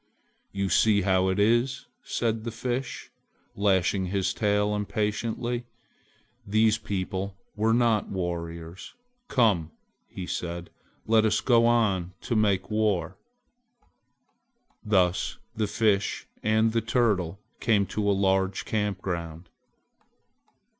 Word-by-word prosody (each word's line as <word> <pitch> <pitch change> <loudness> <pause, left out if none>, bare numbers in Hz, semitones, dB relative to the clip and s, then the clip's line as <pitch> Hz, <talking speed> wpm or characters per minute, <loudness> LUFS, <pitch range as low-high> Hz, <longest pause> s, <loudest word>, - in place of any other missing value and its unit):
"You 100 -1 -2
see 100 +3 +4
how 95 -1 +2
it 95 +1 0
is," 120 +5 +2 0.2
said 115 -2 -2
the 115 - -3
Fish, 120 +3 -4 0.4
lashing 95 -1 +2
his 95 0 0
tail 105 0 +1
impatiently, 110 +3 -2 0.8
"these 110 +2 +2
people 95 -1 -3 0.2
were 110 +2 +2
not 115 -2 +2
warriors!" 85 - -5 0.3
"Come!" 105 - +2 0.4
he 95 - -7
said, 85 -1 -5 0.3
"let 110 0 +4
us 110 -1 +2
go 115 -2 +4
on 100 -7 +1
to 120 - -2
make 105 -2 +1
war." 100 -5 0 1.7
Thus 95 -4 +1 0.2
the 110 -1 0
Fish 105 -1 +1 0.2
and 110 +1 +2
the 115 0 +1
Turtle 105 -6 0 0.2
came 105 -4 +2
to 100 +1 -1
a - - +5
large 95 0 +1
camp 105 -3 -1
ground. 85 -2 -5
105 Hz, 115 wpm, -27 LUFS, 95-110 Hz, 1.7 s, a